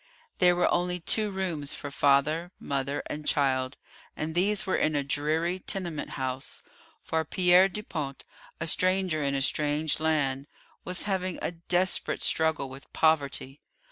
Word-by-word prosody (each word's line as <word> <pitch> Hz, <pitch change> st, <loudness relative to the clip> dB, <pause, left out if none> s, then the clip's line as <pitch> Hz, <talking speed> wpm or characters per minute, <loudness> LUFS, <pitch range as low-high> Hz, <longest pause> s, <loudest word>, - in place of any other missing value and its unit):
There 180 Hz, -1 st, +5 dB
were 175 Hz, -, +3 dB
only 180 Hz, 0 st, 0 dB
two 210 Hz, +5 st, +1 dB
rooms 180 Hz, -7 st, -2 dB
for 145 Hz, -, -7 dB
father, 145 Hz, +5 st, +2 dB
mother, 140 Hz, 0 st, -2 dB
and 150 Hz, 0 st, -6 dB
child, 130 Hz, -2 st, +1 dB, 0.4 s
and 155 Hz, +1 st, -3 dB
these 195 Hz, +4 st, +1 dB
were 190 Hz, -, 0 dB
in 155 Hz, -1 st, +1 dB
a 145 Hz, -, +1 dB
dreary 155 Hz, +6 st, 0 dB
tenement 175 Hz, -5 st, -4 dB
house, 130 Hz, 0 st, -4 dB, 0.4 s
for 160 Hz, 0 st, -1 dB
Pierre 180 Hz, +3 st, +5 dB
Dupont, 155 Hz, -9 st, -5 dB, 0.3 s
a 165 Hz, -, -2 dB
stranger 185 Hz, -1 st, +2 dB
in 140 Hz, -1 st, 0 dB
a 135 Hz, -, +1 dB
strange 150 Hz, +1 st, 0 dB
land, 145 Hz, -3 st, 0 dB, 0.4 s
was 180 Hz, 0 st, -1 dB
having 185 Hz, -3 st, -1 dB
a -, -, -2 dB
desperate 175 Hz, +2 st, 0 dB
struggle 160 Hz, -3 st, +2 dB
with 135 Hz, +1 st, -12 dB
poverty. 145 Hz, -3 st, +1 dB
160 Hz, 145 wpm, -28 LUFS, 140-180 Hz, 0.4 s, There